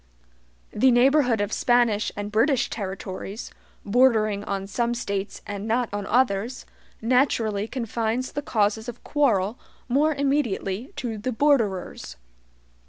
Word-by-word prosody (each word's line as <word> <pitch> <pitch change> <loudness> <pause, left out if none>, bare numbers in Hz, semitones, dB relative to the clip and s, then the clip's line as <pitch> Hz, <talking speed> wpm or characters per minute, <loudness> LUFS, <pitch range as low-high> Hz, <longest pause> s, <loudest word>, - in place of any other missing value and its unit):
The 260 +5 +3
neighborhood 250 -2 +4
of 205 +1 -2
Spanish 240 -4 +2
and 205 0 -5
British 240 +4 +2
territories, 195 0 -6 0.3
bordering 215 -3 +3
on 195 -1 -3
some 235 +4 -1
States 200 -4 -4
and 205 +1 -5
not 235 +1 +1
on 205 -1 -3
others, 240 0 +1 0.4
naturally 225 -4 +1
confines 235 0 -2
the 290 - -3
causes 220 -2 0
of 240 - -10
quarrel 225 -7 +1 0.3
more 290 +5 +2
immediately 265 -6 -1
to 225 -4 -4
the 255 +5 -2
borderers. 225 - 0
225 Hz, 120 wpm, -25 LUFS, 205-255 Hz, 0.4 s, neighborhood